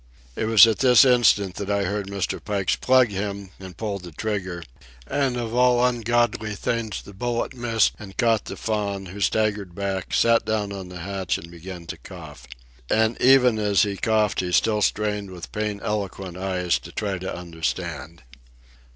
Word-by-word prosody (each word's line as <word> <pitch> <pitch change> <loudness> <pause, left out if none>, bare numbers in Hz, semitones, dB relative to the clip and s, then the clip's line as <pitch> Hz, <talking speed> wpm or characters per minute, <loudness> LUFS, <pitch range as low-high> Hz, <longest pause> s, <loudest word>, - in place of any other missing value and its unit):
It - - -2
was 110 0 +8
at 110 -2 0
this 125 0 +6
instant 105 -7 +3
that 100 -1 -4
I 100 0 +1
heard 100 +1 -2
Mr. 100 -1 -3
Pike's 100 -3 0
"Plug 130 -2 +4
him!" 100 -1 -4
and 95 -3 -10
pulled 100 -2 -3
the 90 -1 -10
trigger; 95 -1 -4 0.4
and 135 -3 0
of 115 -2 -4
all 125 0 +4
ungodly 120 -2 0
things 110 0 -3
the 100 - -12
bullet 120 +5 -2
missed 120 -3 +1
and 95 -3 -11
caught 115 -3 +2
the - - -7
Faun, 100 -3 -2
who 95 +3 -9
staggered 100 -4 0
back, 95 -1 -3
sat 115 0 +4
down 105 -2 -1
on 95 -2 -7
the 90 -1 -8
hatch, 95 -1 -2
and 85 +1 -11
began 85 0 -9
to - - -7
cough. - - -11 0.4
And 110 +1 +2
even 125 -3 +5
as 105 0 +3
he 100 -1 -2
coughed 110 0 +1
he 90 -1 -2
still 105 +5 +2
strained 105 -1 0
with 90 -2 -9
pain 105 -1 -3
eloquent 95 -3 -3
eyes 90 -2 -1
to - - -12
try 100 -3 -3
to 95 - -5
understand. 85 -3 -5
100 Hz, 175 wpm, -24 LUFS, 95-110 Hz, 0.4 s, was